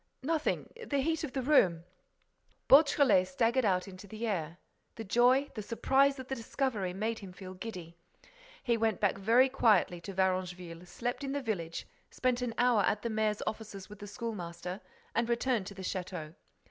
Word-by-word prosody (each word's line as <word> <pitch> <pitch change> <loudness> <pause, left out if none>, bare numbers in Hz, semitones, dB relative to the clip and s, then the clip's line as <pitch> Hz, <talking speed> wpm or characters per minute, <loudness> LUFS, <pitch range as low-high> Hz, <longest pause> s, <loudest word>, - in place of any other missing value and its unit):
"Nothing—the 315 - -2
heat 320 +4 0
of 300 - -3
the 265 - -2
room—" 185 - +4 0.8
Beautrelet 275 -9 +6
staggered 230 +7 +1
out 185 -2 +1
into 190 +1 -11
the 220 +3 -5
air. 170 -6 -2 0.4
The 225 - -6
joy, 250 +6 +3
the 215 - -5
surprise 270 +6 +2
of 260 -1 -8
the 270 - -3
discovery 230 -5 -2
made 220 +4 -2
him 195 -3 -9
feel 185 0 -9
giddy. 185 -4 -8 0.7
He 235 -3 +2
went 220 -3 +1
back 195 -1 +1
very 235 +6 +5
quietly 210 -9 +3
to 195 - -7
Varengeville, 180 -2 -2
slept 245 +8 -4
in 275 0 -3
the 285 - 0
village, 170 -8 -3 0.2
spent 255 -1 0
an 240 -2 -3
hour 245 -3 +4
at 205 +2 0
the 235 - -2
mayor's 215 -1 0
offices 215 -3 -6
with 210 -1 -11
the 205 - -8
school 230 +3 -4
master 180 0 -6 0.3
and 230 0 0
returned 235 -4 0
to 200 - -8
the 190 - -8
château. 180 -4 -4
215 Hz, 175 wpm, -31 LUFS, 185-250 Hz, 0.8 s, Beautrelet